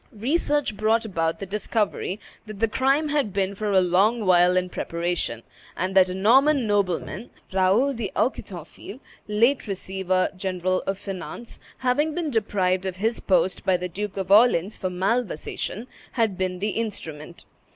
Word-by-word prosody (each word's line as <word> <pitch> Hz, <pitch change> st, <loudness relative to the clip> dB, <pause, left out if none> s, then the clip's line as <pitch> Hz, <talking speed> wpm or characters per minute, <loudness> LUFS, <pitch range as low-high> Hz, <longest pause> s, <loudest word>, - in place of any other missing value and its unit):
Research 290 Hz, 0 st, 0 dB
brought 220 Hz, +2 st, +1 dB
about 165 Hz, -5 st, -1 dB
the 195 Hz, -, -6 dB
discovery 205 Hz, 0 st, -2 dB, 0.3 s
that 215 Hz, -2 st, -8 dB
the 225 Hz, -, +3 dB
crime 275 Hz, +7 st, +1 dB
had 285 Hz, -8 st, 0 dB
been 195 Hz, 0 st, -1 dB
for 210 Hz, +1 st, -2 dB
a 190 Hz, -1 st, +5 dB
long 200 Hz, +6 st, +2 dB
while 180 Hz, 0 st, +5 dB
in 185 Hz, 0 st, +1 dB
preparation, 170 Hz, -10 st, -3 dB, 0.3 s
and 185 Hz, +2 st, -1 dB
that 190 Hz, -1 st, +5 dB
a 180 Hz, -, -4 dB
Norman 260 Hz, +7 st, +4 dB
nobleman, 205 Hz, +2 st, -1 dB, 0.2 s
Raoul 195 Hz, +9 st, +3 dB
d'Auquetonville, 200 Hz, -, -4 dB, 0.3 s
late 230 Hz, +5 st, +2 dB
receiver 190 Hz, -1 st, -1 dB
general 185 Hz, -1 st, -1 dB
of 195 Hz, 0 st, -1 dB
finance, 200 Hz, +4 st, -7 dB, 0.2 s
having 290 Hz, +5 st, +1 dB
been 335 Hz, -4 st, -2 dB
deprived 190 Hz, -4 st, 0 dB
of 185 Hz, -, -3 dB
his 220 Hz, +5 st, -1 dB
post 185 Hz, -1 st, +1 dB
by 185 Hz, -1 st, +2 dB
the 180 Hz, +1 st, -4 dB
Duke 200 Hz, +3 st, -5 dB
of 190 Hz, -1 st, -3 dB
Orleans 210 Hz, -3 st, +5 dB
for 185 Hz, -, -3 dB
malversation, 195 Hz, +2 st, -2 dB, 0.3 s
had 225 Hz, -5 st, +1 dB
been 185 Hz, 0 st, -2 dB
the 205 Hz, +3 st, -1 dB
instrument. 170 Hz, -7 st, -6 dB
195 Hz, 150 wpm, -24 LUFS, 185-230 Hz, 0.3 s, a